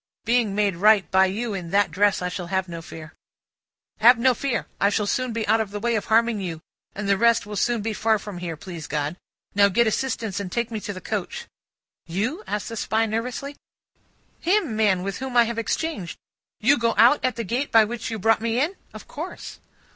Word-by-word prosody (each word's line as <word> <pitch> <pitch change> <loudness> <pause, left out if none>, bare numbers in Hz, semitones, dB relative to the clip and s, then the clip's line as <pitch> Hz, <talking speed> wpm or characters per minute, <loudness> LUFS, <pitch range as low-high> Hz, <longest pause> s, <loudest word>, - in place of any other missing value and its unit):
Being 230 -3 +2
made 205 -4 +1
right 210 +1 +4
by 190 0 +5
you 215 +4 -3
in 180 -4 -5
that 200 +2 +2
dress, 200 -1 +2
I 180 - -1
shall 180 -1 -5
have 190 0 -1
no 170 -1 -7
fear." 160 -1 -10 0.9
"Have 240 +2 +7
no 255 +2 +4
fear! 250 -1 -2
I 200 - +4
shall 210 0 0
soon 255 +4 -1
be 225 -1 -3
out 220 +2 +3
of 215 - -3
the 205 +1 -5
way 235 +2 0
of 215 - -1
harming 225 -1 +2
you, 170 -4 -4 0.4
and 210 0 -4
the 200 -1 +2
rest 235 -1 +3
will 210 0 -7
soon 230 +2 0
be 225 0 -2
far 220 +2 +2
from 200 -3 -8
here, 170 -3 -5
please 170 -1 -8
God! 150 +1 -2 0.4
Now, 200 0 +5
get 235 +5 +3
assistance 220 -3 -1
and 190 -3 -5
take 235 +2 -2
me 220 - -3
to 205 - -5
the 185 - -9
coach." - - -4 0.6
"You?" 225 - -2
said 210 - -2
the 230 +3 -7
Spy 220 +1 +1
nervously. 250 +6 -4 0.8
"Him, 350 - +1
man, 205 -4 +2
with 195 0 -4
whom 260 -2 -3
I 240 - +8
have 230 0 -3
exchanged. 230 - -3 0.4
You 275 +5 +4
go 230 -1 +1
out 245 +6 +5
at 255 - 0
the 235 - -3
gate 245 +7 -2
by 225 -2 +7
which 225 +1 -4
you 225 - -3
brought 225 +2 +2
me 230 +1 0
in?" 325 +8 0 0.2
"Of - - -10
course." - - -8
220 Hz, 220 wpm, -24 LUFS, 195-235 Hz, 0.9 s, I